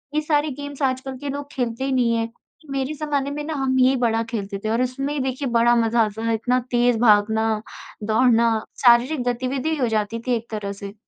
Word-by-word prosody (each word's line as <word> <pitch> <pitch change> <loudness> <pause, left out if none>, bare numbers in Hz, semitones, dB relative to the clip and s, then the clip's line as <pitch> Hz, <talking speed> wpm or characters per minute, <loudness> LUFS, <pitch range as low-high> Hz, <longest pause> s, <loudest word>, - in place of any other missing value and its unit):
ये 305 - +2
सारे 300 0 +1
गेम्स 285 +1 -8
आजकल 260 0 -1
के 285 +1 -6
लोग 285 +1 -5
खेलते 245 0 -3
ही 270 - -1
नहीं 245 -3 +2
हैं। 230 0 -1 0.4
मेरे 270 +2 -2
ज़माने 285 -2 -2
में 295 +1 -4
ना 315 +1 -4
हम 265 -1 0
ये 260 +1 +5
बड़ा 230 -2 +1
खेलते 200 -3 -3
थे, - - 0
और 230 +3 +1
इसमें 275 +3 -2
देखिए 265 +1 -2
बड़ा 235 0 +4
मज़ा 230 0 +2
आता 220 +1 -2
था, - - +2
इतना 245 +3 +1
तेज़ 240 -1 +3
भागना, 220 0 +3 0.4
दौड़ना, 230 +1 +3 0.3
शारीरिक 245 +3 +5
गतिविधि 260 +5 -1
हो 250 -3 +1
जाती 220 +1 -1
थी 245 - +2
एक 230 0 -6
तरह 205 -2 -4
से। 200 0 -8
245 Hz, 205 wpm, -22 LUFS, 225-275 Hz, 0.4 s, ये